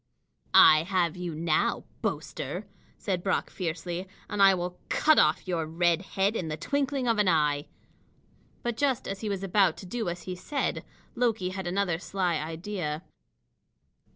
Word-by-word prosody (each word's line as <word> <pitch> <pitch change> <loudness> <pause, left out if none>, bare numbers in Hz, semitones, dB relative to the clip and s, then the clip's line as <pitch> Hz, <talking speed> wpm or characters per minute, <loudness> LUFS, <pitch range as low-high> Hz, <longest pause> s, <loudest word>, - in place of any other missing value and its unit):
"I 155 0 +9
have 175 -1 0
you 175 -3 -5
now, 160 0 +1 0.2
boaster," - - -3 0.3
said 185 -4 -2
Brock 190 +1 -1
fiercely, 175 +1 -4 0.2
"and 205 -1 -2
I 195 -1 +7
will 180 0 -4
cut 310 0 +4
off 150 +5 +3
your 165 -3 -1
red 170 +1 +2 0.2
head 195 +3 +2
in 180 - -2
the 155 0 -3
twinkling 275 - -1
of 230 -2 +2
an 205 - +3
eye." 150 -3 +2 1.0
But 240 -1 -2
just 270 -3 0
as 195 0 -4
he 215 - -2
was 195 -1 -3
about 195 -3 +3
to - - -9
do 225 0 -3
as 175 +1 -5
he 185 - -5
said, 280 +10 -2 0.3
Loki 225 -6 0
had 185 -1 -5
another 180 -2 0
sly 180 -3 -1
idea. 160 0 -4
180 Hz, 160 wpm, -28 LUFS, 165-205 Hz, 1.0 s, I